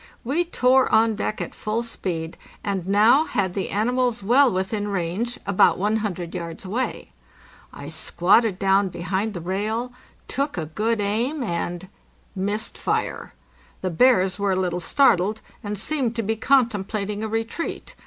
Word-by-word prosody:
We 300 +9 0
tore 260 -5 +3
on 225 0 +4
deck 215 0 -3
at - - -5
full 220 +2 -2
speed, 170 -8 -4 0.3
and 195 -3 -2
now 220 +10 +5
had 190 - -1
the 195 - -3
animals 240 +1 0
well 250 +5 +5
within 205 +2 -2
range, 200 +5 -2
about 200 -1 +4
100 200 -4 -1
yards 170 -1 -6
away. 220 - -3 0.6
I 140 - -9
squatted 180 +6 +2
down 195 0 +3
be 175 - -8
hind 195 +5 -1
the 175 - -4
rail, 215 +7 -2 0.3
took 280 -4 -2
a 160 - -2
good 215 +8 -1
aim, 235 +8 0
and—missed 190 +3 -5
fire. - - -2 0.5
The 185 - -2
bears 190 -2 +3
were 200 -1 +1
a 185 - 0
little 180 -1 -1
startled, 215 -1 +3 0.2
and 205 0 -4
seemed 250 +1 0
to 230 - -1
be 220 +2 0
contemplating 215 -4 +1
a - - -1
retreat. 225 +9 -4
205 Hz, 150 wpm, -23 LUFS, 185-230 Hz, 0.6 s, now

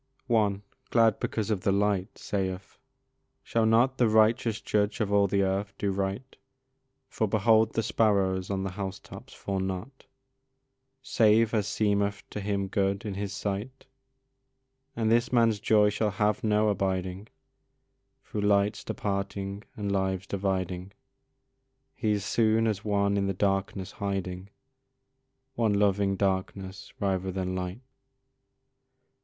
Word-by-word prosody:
One, 105 -5 +1 0.3
glad 115 -2 +4
because 110 0 -2
of 100 -4 0
the 100 - +1
light, 100 -1 0
saith, 95 -1 -4 0.6
"Shall 115 -1 +1
not 120 +4 +3
The 120 -3 +4
righteous 110 0 +3
Judge 105 0 0
of 105 -2 0
all 100 0 +4
the 100 +1 +1
earth 100 +1 -1
do 100 - -1
right, 100 +7 -3 0.7
For 110 - -1
behold 110 +2 +3
the 115 - 0
sparrows 95 -4 +1
on 95 -1 -1
the 95 - -3
house 95 +1 -4
tops - - -12
fall 100 -1 -4
not 95 +8 -5 1.0
Save 115 -4 +3
as 105 -3 +1
seemeth 100 -2 0
to 105 - -4
Him 100 -1 -1
good 100 +1 0
in 105 - -3
His 100 0 -4
sight?" 105 +6 -4 1.1
And 115 -1 +1
this 120 +1 +2
man's 115 -4 +3
joy 105 0 +4
shall 105 +1 0
have 105 +4 0
no 105 0 +3
abiding, 95 0 -2 1.0
Through 105 - -4
lights 100 0 +2
departing 100 0 -3 0.2
and 100 -2 -2
lives 95 -1 -1
dividing, 95 -1 -2 1.0
He 105 -1 0
is 100 -1 -2
soon 110 +1 +2
as 105 -2 -1
one 100 -1 +1
in 100 0 +1
the 95 - -1
darkness 95 0 -1
hiding, 95 -1 -4 1.0
One 115 -4 +1
loving 100 -1 +2
darkness 95 0 -2
rather 95 -1 -1
than 95 0 -3
light. 95 +4 -4
100 Hz, 135 wpm, -28 LUFS, 95-110 Hz, 1.1 s, glad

